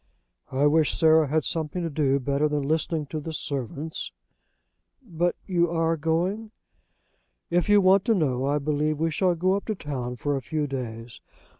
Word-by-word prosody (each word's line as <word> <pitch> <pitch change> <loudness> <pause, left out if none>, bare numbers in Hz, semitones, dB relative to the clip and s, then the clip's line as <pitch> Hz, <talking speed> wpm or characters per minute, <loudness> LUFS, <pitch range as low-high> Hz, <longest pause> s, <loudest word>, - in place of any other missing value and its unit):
"I 135 +2 +1
wish 155 0 +3
Sarah 160 -2 +5
had 155 +2 +1
something 165 +3 -2
to 165 - -2
do 140 -2 +1
better 140 +3 0
than 150 -1 -1
listening 160 0 0
to 155 - -2
the 160 +2 -6
servants?" 145 +1 -4 0.9
"But 175 -5 -1
you 175 -3 +1
are 165 0 +1
going?" 175 +8 -1 1.0
"If 175 +2 +1
you 205 0 +6
want 190 +1 +4
to 225 - +3
know, 135 -7 0
I 145 +1 +2
believe 150 +1 0
we 165 0 +1
shall 180 +2 +1
go 185 +3 +1
up 200 - -2
to 215 - -2
town 130 -7 -5
for 145 +5 -1
a 135 - -2
few 155 +2 -2
days. 120 -4 -6
155 Hz, 175 wpm, -25 LUFS, 140-170 Hz, 1.0 s, you